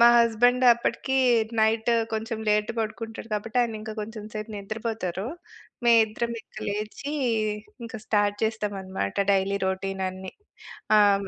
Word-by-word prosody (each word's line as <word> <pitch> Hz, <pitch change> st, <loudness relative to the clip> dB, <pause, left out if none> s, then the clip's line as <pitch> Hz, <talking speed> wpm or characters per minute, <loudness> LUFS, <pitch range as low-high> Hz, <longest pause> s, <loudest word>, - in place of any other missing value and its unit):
మా 235 Hz, -, +9 dB
హస్బెండ్ 245 Hz, +2 st, +4 dB
అప్పటికి 240 Hz, +3 st, -1 dB, 0.4 s
నైట్ 225 Hz, +2 st, +2 dB, 0.2 s
కొంచెం 220 Hz, +1 st, -2 dB
లేట్ 210 Hz, +1 st, +2 dB
పడుకుంటాడు 225 Hz, +1 st, -5 dB
కాబట్టి 225 Hz, +4 st, -2 dB
ఆయన 230 Hz, -2 st, -2 dB
ఇంకా 215 Hz, 0 st, -6 dB
కొంచెం 215 Hz, 0 st, -6 dB
సేపు 215 Hz, +1 st, -5 dB
నిద్రపోతారు. 215 Hz, -2 st, -3 dB, 0.6 s
మేమిద్దరం 230 Hz, 0 st, +4 dB
ఇంక -, -, -29 dB
లేచి 215 Hz, +8 st, -4 dB, 0.7 s
ఇంక 225 Hz, -, -6 dB
స్టార్ట్ 205 Hz, -1 st, +2 dB
చేస్తాం 215 Hz, -2 st, -1 dB
అన్నమాట. 185 Hz, -, -3 dB, 0.2 s
డైలీ 195 Hz, +1 st, +1 dB
రొటీన్ 190 Hz, 0 st, -2 dB
అన్ని. 190 Hz, 0 st, -8 dB, 0.7 s
ఆహ్ 200 Hz, -1 st, +4 dB
215 Hz, 130 wpm, -26 LUFS, 200-230 Hz, 0.7 s, మా